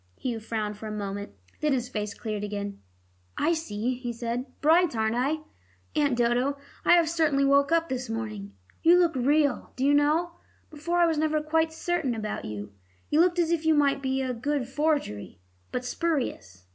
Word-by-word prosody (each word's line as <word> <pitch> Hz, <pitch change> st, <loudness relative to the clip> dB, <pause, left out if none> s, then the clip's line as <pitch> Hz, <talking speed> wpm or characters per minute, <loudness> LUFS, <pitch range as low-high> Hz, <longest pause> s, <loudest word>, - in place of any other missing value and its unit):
Hugh 240 Hz, -3 st, -3 dB
frowned 215 Hz, -2 st, -4 dB
for 220 Hz, -, -6 dB
a -, -, -5 dB
moment; 200 Hz, -, -5 dB, 0.3 s
then 300 Hz, -2 st, +1 dB
his 245 Hz, -2 st, -1 dB
face 210 Hz, -3 st, -4 dB
cleared 215 Hz, -2 st, -4 dB
again. 200 Hz, -1 st, -4 dB, 0.6 s
"I 335 Hz, -, +2 dB
see," 245 Hz, -7 st, -2 dB
he 245 Hz, -1 st, -4 dB
said. 235 Hz, +2 st, -3 dB
"Bright, 325 Hz, -1 st, +4 dB
aren't 220 Hz, 0 st, +1 dB
I? 275 Hz, +6 st, 0 dB, 0.5 s
Aunt 285 Hz, -5 st, +2 dB
Dodo, 245 Hz, +4 st, +1 dB, 0.3 s
I -, -, +6 dB
have 340 Hz, -2 st, +5 dB
certainly 305 Hz, -4 st, +2 dB
woke 280 Hz, +2 st, +4 dB
up 330 Hz, 0 st, +3 dB
this 260 Hz, -3 st, -4 dB
morning. 215 Hz, -3 st, -5 dB, 0.3 s
You 340 Hz, +2 st, +6 dB
look 340 Hz, -4 st, +3 dB
real, 285 Hz, +2 st, +1 dB
do 260 Hz, -, -1 dB
you 285 Hz, -, +4 dB
know; 305 Hz, +4 st, +3 dB, 0.4 s
before 315 Hz, +3 st, -2 dB
I 345 Hz, -, +5 dB
was 325 Hz, -2 st, +1 dB
never 310 Hz, 0 st, +1 dB
quite 320 Hz, +1 st, +1 dB
certain 320 Hz, -6 st, -1 dB
about 215 Hz, -1 st, -4 dB
you. 105 Hz, -1 st, -6 dB, 0.4 s
You 300 Hz, -, +3 dB
looked 355 Hz, 0 st, +3 dB
as 340 Hz, -1 st, +2 dB
if 335 Hz, -2 st, +1 dB
you 320 Hz, -1 st, +4 dB
might 280 Hz, -2 st, +2 dB
be 265 Hz, 0 st, 0 dB
a 255 Hz, -1 st, -2 dB
good 265 Hz, +2 st, -2 dB
forgery, 280 Hz, -, -1 dB, 0.3 s
but 250 Hz, -, -3 dB
spurious. 250 Hz, -, -2 dB
270 Hz, 185 wpm, -27 LUFS, 225-315 Hz, 0.6 s, I